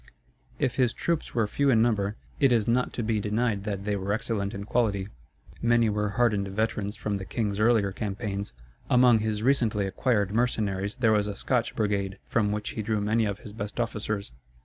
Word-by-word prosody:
If 130 - -1
his 125 -4 +3
troops 170 -2 -2
were 115 -2 +3
few 140 +7 +1
in 115 -4 +5
number, 105 -3 0 0.2
it 135 -3 +4
is 115 -4 +2
not 125 +2 +2
to 120 - -2
be 110 -1 0
denied 105 0 -1
that 100 -2 -3
they 105 -1 0
were 100 +1 -1
excellent 105 -3 -1
in 100 - -5
quality. 100 -3 0 0.5
Many 115 -2 +3
were 105 0 0
hardened 105 -5 +2
veterans 105 0 -2
from 105 -1 -2
the 95 - -6
king's 105 -1 -2
earlier 110 -3 +3
campaigns; 100 0 -4 0.4
among 125 -2 +6
his 110 0 -1
recently 115 -6 +2
acquired 100 0 0
mercenaries 105 -4 0
there 120 -4 +2
was 105 -1 +2
a 105 - -4
Scotch 120 +2 0
brigade, 100 -2 -1
from 105 -3 +1
which 105 0 -2
he 110 - -4
drew 110 0 0
many 110 +2 +1
of 100 0 -3
his 105 - -10
best 105 +1 -6
officers. 105 - -2
105 Hz, 195 wpm, -27 LUFS, 100-115 Hz, 0.5 s, among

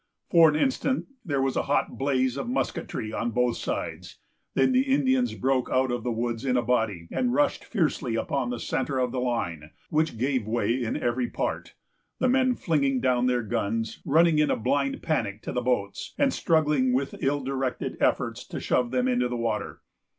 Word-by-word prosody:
For 165 -2 +7
an 150 - 0
instant, 265 - 0 0.2
there 140 -5 0
was 135 -1 0
a - - +2
hot 145 - +1
blaze 130 -2 +1
of 135 -4 -4
musketry 125 -4 -3
on 115 - -1
both 125 +1 +1
sides; - - -4 0.4
then - - +4
the 255 0 +4
Indians 260 -2 +2
broke 130 -1 0
out 130 0 +2
of 120 -2 -2
the 125 - -1
woods 115 +1 -2
in 130 -2 +1
a 120 - +1
body, 110 -9 0
and 245 -1 0
rushed 290 0 +1
fiercely 150 - -1
upon 130 +2 -1
the 120 -1 -3
centre 135 +3 -2
of 125 -1 0
the 130 - -2
line, 85 -11 -2 0.2
which 155 -5 +1
gave 130 -2 0
way 115 +1 +1
in 120 -3 -1
every 120 +1 -1
part; - - -3 0.4
the 255 - +1
men 255 0 +3
flinging 140 - +1
down 125 -1 +2
their 125 -1 +1
guns, 110 +1 -2
running 160 +1 +4
in 150 - +3
a - - +1
blind 140 +5 0
panic 105 -9 -1
to - - -4
the 125 - -1
boats, 120 -5 -2
and 275 -2 +2
struggling 150 -6 +2
with 135 +2 -2
ill 140 0 +1
directed 130 -1 -2
efforts - - 0
to - - -5
shove 125 -1 +1
them 125 0 +1
into 125 -1 +2
the 120 0 -3
water. 115 -2 -3
130 Hz, 195 wpm, -26 LUFS, 120-150 Hz, 0.4 s, For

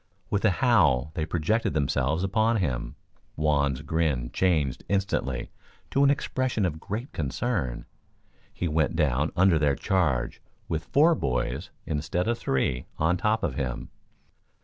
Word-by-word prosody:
With 100 - 0
a - - +6
howl 85 - +3
they 80 0 -2
projected 85 +3 0
themselves 70 +2 +1
upon 110 +4 +2
him. 65 - -2 0.4
Juan's 70 -3 +1
grin 75 -6 0
changed 80 -8 +1
instantly 95 -10 -1 0.4
to 140 - +3
an 140 - +6
expression 130 -6 0
of 80 -3 -2
great 110 - -5
concern. 75 - -2 0.7
He 90 - -3
went 80 +1 +1
down 75 -1 +1
under 90 -2 +4
their 75 -2 +2
charge, 70 -9 0 0.3
with 80 0 -3
four 160 +4 +4
boys, 65 - -2 0.2
instead 80 +5 -1
of 120 0 0
three, 65 -1 -1
on 80 +3 +2
top 105 +4 0
of 75 - 0
him. 65 -3 -4
80 Hz, 140 wpm, -27 LUFS, 70-100 Hz, 0.7 s, a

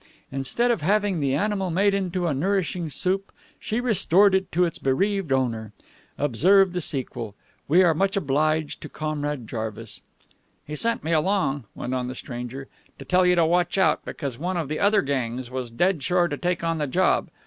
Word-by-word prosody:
Instead 135 - 0
of 230 - -1
having 200 +1 +1
the 140 -2 +1
animal 195 +2 0
made 195 +4 +2
into 185 -2 -1
a 160 - +1
nourishing 180 +1 -1
soup, 190 +6 -1 0.3
she 220 - -2
restored 205 -4 +4
it 190 0 0
to 180 +2 +3
its 165 - -4
bereaved 190 +5 0
owner. 115 -5 -1 0.4
Observe 180 - +4
the 180 - -2
sequel. 125 -9 -3 0.3
We 170 +6 +5
are 170 -2 +4
very 155 - -5
much 195 0 +1
obliged 155 -1 0
to - - -8
Comrade 150 -5 -3
Jarvis." 110 -2 -5 0.6
"He 150 - -6
sent 230 +8 0
me 160 - -2
along," 155 - +1
went 125 - -4
on 125 -1 -1
the 130 - -5
stranger, 125 +2 -7 0.3
"to - - -10
tell 180 0 +3
you 180 - +4
to 170 -2 +4
watch 175 +3 +1
out, 190 - +3
because 135 -6 -5
one 180 +3 -2
of 160 -5 -3
the 155 - -2
other 205 -1 +3
gangs 130 -2 -3
was 130 -2 -4
dead 170 +8 +1
sure 175 +4 +2
to 145 - -3
take 175 +2 -2
on 165 -1 0
the 150 - -1
job. 180 +8 +1
165 Hz, 190 wpm, -24 LUFS, 135-190 Hz, 0.6 s, We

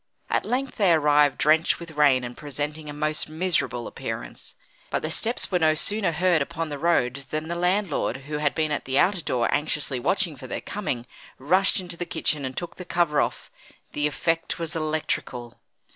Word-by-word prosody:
At - - +1
length 260 +1 -2
they 200 -6 +4
arrived 150 -2 +4
drenched 160 +2 +3
with 170 -1 -9
rain 145 -4 +4
and 120 0 -6
presenting 150 +1 -4
a - - -4
most 150 +1 -2
miserable 160 -7 -1
appearance. - - -7 0.3
But - - -1
their 155 - -2
steps 230 +6 +1
were 180 - +2
no 155 -1 +4
sooner 205 +3 +2
heard 175 -1 +2
upon 160 +3 -3
the 145 -1 -5
road 140 -5 +1
than 155 +1 -3
the 170 - -2
landlord, 180 - 0
who 150 0 -3
had 150 -1 +1
been 155 -1 0
at 145 - -2
the 130 +1 0
outer 190 +3 +3
door 125 -5 0
anxiously 145 -3 0
watching 175 +4 +1
for 130 -1 -10
their - - -3
coming, 140 - -3 0.3
rushed 185 +9 +3
into 175 -2 -5
the 175 - -4
kitchen 150 -4 0
and 130 0 -5
took 170 -1 -5
the 180 - -6
cover 170 -4 +2
off. - - -3 0.4
The 150 0 +1
effect 165 +3 -1
was 165 -2 -4
electrical. 155 -6 -3
155 Hz, 190 wpm, -25 LUFS, 145-175 Hz, 0.4 s, they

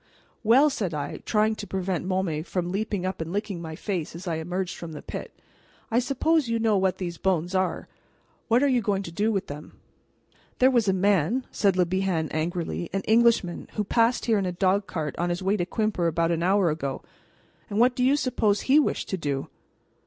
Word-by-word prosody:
"Well," 265 +7 +5
said 190 - -2
I, 145 -1 -4
trying 215 0 +2
to 205 - -6
prevent 185 -1 -2
Môme 185 -5 -1
from 175 0 -3
leaping 200 -1 -2
up 185 -2 -3
and 160 +1 -4
licking 200 -3 -3
my 160 -1 -6
face 175 -4 -4
as 180 +2 -8
I 165 -2 -1
emerged 180 +3 -3
from 165 -2 -8
the 150 - -8
pit, - - -6 0.6
"I 230 - +4
suppose 280 +3 +1
you 230 - +1
know 225 -2 +2
what 190 -1 +1
these 175 -3 -5
bones 180 -1 0
are. 185 -1 0 0.6
What 240 +4 +3
are - - +4
you 255 -3 +2
going 200 -2 0
to 170 - -7
do 210 +6 0
with 195 -2 -1
them?" 150 -1 -10 0.8
"There 260 +1 +5
was 235 -4 +2
a - - +5
man," 200 - +2
said 195 -3 +2
Le 180 - +4
Bihan 180 -3 -1
angrily, 170 +1 -2
"an 195 - -1
Englishman, 225 -5 +2
who 210 - -1
passed 230 +4 +2
here 225 -3 +3
in 190 - -1
a - - -1
dog 190 +2 +1
cart 155 -4 -3
on 175 +1 0
his 175 +2 -2
way 195 +2 +2
to 175 -4 -1
Quimper 215 -6 0
about 165 +1 +1
an 170 -1 0
hour 185 -1 +3
ago, 140 -3 -4 0.7
and 205 - -3
what 245 +1 +4
do 250 - 0
you 265 +3 +4
suppose 220 -7 +1
he 280 +3 +5
wished 300 - 0
to 190 - -1
do?" 140 -5 -3
190 Hz, 210 wpm, -26 LUFS, 170-220 Hz, 0.8 s, Well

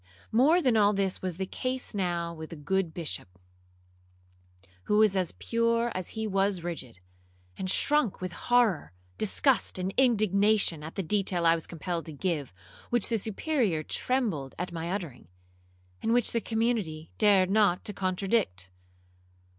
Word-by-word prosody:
'More 305 +10 +4
than 250 -3 +3
all 210 -1 +4
this 195 -2 -1
was 185 -3 -3
the 190 - -2
case 255 +6 -3
now 175 -4 -1
with 160 -1 -8
the - - -8
good 175 +3 -1
Bishop, 150 - -5 1.5
who 210 - +2
was 215 -2 +4
as 185 -3 0
pure 230 0 0
as 185 +4 -5
he 220 - -1
was 195 -3 0
rigid, 130 - -6 0.6
and 185 - -4
shrunk 290 +1 +2
with 185 -1 -4
horror, 235 - +1 0.3
disgust, 250 +3 +1
and 185 +1 -3
indignation, 210 - +3
at 160 +2 -8
the 195 - -2
detail 185 -1 0
I 165 - +6
was 165 -1 -3
compelled 170 0 -4
to 160 - -7
give, 150 -3 -2 0.4
which 240 - +3
the 230 -2 +1
Superior 215 - -1
trembled 205 - -1
at 180 +1 -4
my 165 0 -4
uttering, 175 - -5 0.7
and 225 - +1
which 245 -2 +4
the 230 - 0
community 220 -10 -2
dared 195 -3 +4
not 205 -4 +3
to 210 - -4
contradict. 185 - -1
195 Hz, 155 wpm, -28 LUFS, 170-225 Hz, 1.5 s, I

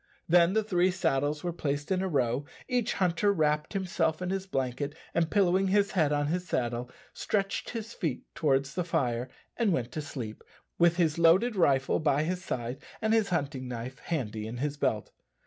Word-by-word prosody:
Then 170 +1 +5
the 220 0 +2
three 185 -3 +2
saddles 150 -4 0
were 175 -1 -2
placed 145 0 -3
in 185 -1 +2
a 190 - 0
row; 130 -5 +1 0.2
each 250 -3 0
hunter 185 +2 +2
wrapped 150 -3 +1
himself 175 -5 0
in 180 0 -2
his 195 0 -2
blanket, 135 -1 -2 0.2
and 165 -1 +1
pillowing 190 -1 +3
his 200 +1 +3
head 155 -6 +2
on 145 0 +1
his 180 +4 -2
saddle, 120 -3 -1 0.2
stretched 195 -2 -1
his 230 -1 -5
feet 155 - -3
towards 140 -2 +1
the 180 - -1
fire 130 -8 -1 0.3
and 230 -4 +2
went 125 -7 -1
to 155 - -3
sleep, 125 -7 -7 0.4
with 170 0 +5
his 170 -2 +1
loaded 185 +8 +5
rifle 135 -7 +3
by 150 -2 +2
his 180 +3 -2
side 125 -2 -4 0.2
and 220 0 +1
his 220 -3 +3
hunting 140 -6 -2
knife 125 +2 -6
handy 110 -9 -3
in 115 +2 -6
his 145 +3 -2
belt. 110 -7 -1
160 Hz, 185 wpm, -29 LUFS, 135-185 Hz, 0.4 s, Then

